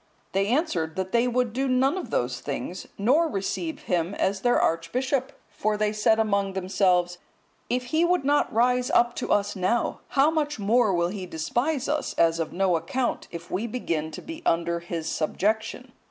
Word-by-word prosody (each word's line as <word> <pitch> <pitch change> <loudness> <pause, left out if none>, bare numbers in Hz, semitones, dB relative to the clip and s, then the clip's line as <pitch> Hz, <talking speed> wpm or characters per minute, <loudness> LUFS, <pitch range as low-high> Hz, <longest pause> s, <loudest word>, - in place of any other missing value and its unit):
They 195 +1 +1
answered 205 - 0
that 190 0 -3
they 235 +1 +3
would 245 -2 0
do 270 +2 0
none 260 +4 +2
of 375 - -5
those 125 0 -1
things, 160 +6 -5
nor 270 +11 +3
receive 310 - -3
him 180 - -1
as 195 0 0
their 245 +2 +3
archbishop; 255 - 0 0.2
for 210 +1 -1
they 210 0 0
said 215 +1 +3
among 200 -3 +1
themselves, 180 -2 +1 0.5
"if 250 +1 0
he 315 +7 +1
would 350 -4 +2
not 290 +1 +2
rise 250 +2 +2
up 240 0 +3
to - - -3
us 205 0 +1
now, 195 +6 0 0.2
how 285 +3 +5
much 300 -2 -1
more 215 +1 +3
will 170 -1 +1
he 190 -1 -5
despise 240 - -1
us, 300 +1 -1
as 165 0 +3
of 165 - -2
no 185 -1 +2
account, 240 +10 -2
if 170 0 -9
we 205 +6 -1
begin 165 -10 -2
to - - -9
be 325 0 -8
under 170 0 +1
his 170 -2 -5
subjection?" 220 +9 -1
210 Hz, 185 wpm, -26 LUFS, 180-255 Hz, 0.5 s, how